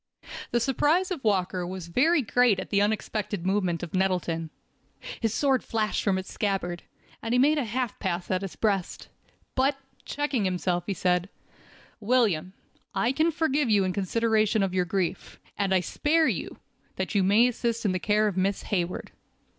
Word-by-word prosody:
_ - - -20 0.2
THE 240 - +1
surprise 295 - +1
of 340 -7 -4
Walker 185 -4 +1
was 180 0 -5
very 290 - +3
great 230 -2 +3
at 190 - -7
the 200 - +3
unexpected 205 -2 -2
movement 185 -3 0
of 170 - -7
Nettleton. 180 -4 0 0.7
His 225 -2 0
sword 265 +2 +1
flashed 215 -2 -1
from 195 -2 +2
its 190 - -6
scabbard, 190 -4 -2 0.4
and 225 - -2
he - - +4
made 295 +4 +4
a 270 - -1
half 240 0 -3
pass 180 -1 -3
at 185 0 +1
his 195 -2 -6
breast. 200 -5 -1 0.4
But, 270 +2 +1 0.3
checking 285 -6 -1
himself, 180 -1 -1
he 200 - -1
said: 180 +1 +1 0.7
"William, 205 -7 +1 0.4
I 195 +6 +2
can 315 +5 +2
forgive 300 -5 0
you 205 -2 +4
in 185 -1 -1
consideration 215 +2 +1
of 190 -2 -1
your 180 -1 +1
grief, 180 0 -3 0.2
and 200 -1 -1
I 185 -1 +4
spare 310 - +1
you, - - -3 0.4
that 190 +2 -3
you 200 - +3
may 205 +6 +5
assist 235 -2 -2
in 200 - +3
the 185 - -1
care 210 +5 +2
of 200 - -2
Miss 190 +1 0
Hayward. 180 -3 -2
205 Hz, 180 wpm, -27 LUFS, 185-240 Hz, 0.7 s, may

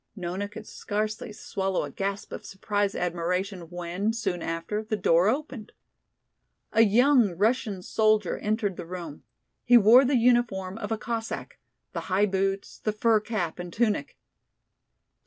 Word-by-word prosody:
Nona 185 +1 -3
could 205 - -10
scarcely 215 +1 -3
swallow 195 -2 -2
a 145 - -6
gasp 195 +5 -4
of - - -7
surprised 205 0 -2
admiration 180 +1 -2
when, 175 +5 -2
soon 195 -6 -2
after, 165 +6 -3
the 220 0 -2
door 180 -1 +3
opened. 260 -4 -4 1.0
A 225 - +5
young 230 - +4
Russian 210 -2 0
soldier 215 -4 +2
entered 210 -3 -1
the 175 - -6
room. 170 -4 -7 0.4
He 245 0 +7
wore 235 +4 +7
the 265 0 +2
uniform 225 -5 +1
of 210 -1 -5
a 225 - 0
Cossack: 225 +1 -5 0.3
the - - -2
high 190 +3 +3
boots, 195 0 -2
the 215 - -1
fur 220 0 +3
cap 205 -6 -3
and 175 0 -6
tunic. 210 -8 -1
205 Hz, 145 wpm, -27 LUFS, 180-220 Hz, 1.0 s, He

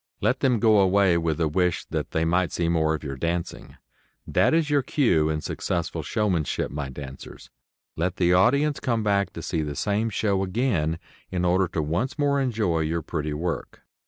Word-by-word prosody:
Let - - +1
them 125 -3 +2
go 110 -1 +5
away 95 -1 +4
with 80 -2 -1
a 80 - +2
wish 90 +3 0
that - - -2
they 80 0 0
might 90 +1 +1
see 85 - -1
more 80 -2 +2
of 80 - -8
your 70 -2 -4
dancing. 85 +4 -4 0.5
That - - +2
is 160 -1 +2
your 145 -1 +2
cue 100 - +2
in 75 0 -1
successful 85 0 -3
showmanship, 90 - -1
my 70 -2 -4
dancers. 65 0 -10 0.4
Let 90 +3 -1
the 90 -1 +2
audience 140 +11 +3
come 115 -4 -1
back 100 -3 +1
to - - -7
see 80 - -1
the 75 -2 -4
same 105 +8 0
show 100 -2 0
again 95 - 0 0.3
in 90 -1 -1
order 90 +1 +3
to 80 -3 -2
once 95 - -2
more 140 -1 +2
enjoy 110 -10 0
your 80 +1 -1
pretty 75 -2 -3
work. 85 +2 -4
90 Hz, 190 wpm, -25 LUFS, 80-110 Hz, 0.5 s, go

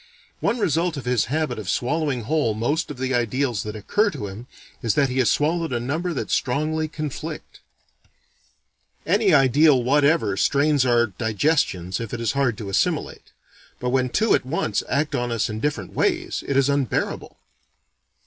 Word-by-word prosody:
One 235 - 0
result 170 - 0
of 135 - -6
his 125 -3 +1
habit 155 0 -2
of 100 -4 -6
swallowing 140 +1 0
whole 115 -2 0
most 145 +10 -1
of 145 - -7
the 130 +1 -2
ideals 120 -1 0
that 105 0 -6
occur 205 - +1
to 145 - -6
him, 100 +5 -8 0.3
is 115 -5 0
that 140 -2 +3
he 130 +1 -1
has 120 -4 +3
swallowed 165 +1 0
a 120 - 0
number 155 +9 -2
that 150 - -4
strongly 155 +4 0
conflict. 155 -2 -6 1.5
Any 200 +3 +3
ideal 140 -1 +5
whatever 140 -5 +2
strains 140 +2 +2
our 120 -1 +4
digestions 110 - 0
if 115 0 -5
it - - -6
is 115 -2 0
hard 135 -6 0
to 105 -3 -6
assimilate: 100 - -1 0.5
but 125 0 -2
when 130 -1 +1
two 220 - +2
at - - +2
once 130 -6 -1
act 150 +1 0
on 120 -1 -1
us 115 -1 -1
in 105 - -4
different 115 -9 -3
ways, - - -1
it 140 - 0
is 135 -1 +4
unbearable. 140 -4 -1
130 Hz, 170 wpm, -23 LUFS, 115-155 Hz, 1.5 s, ideal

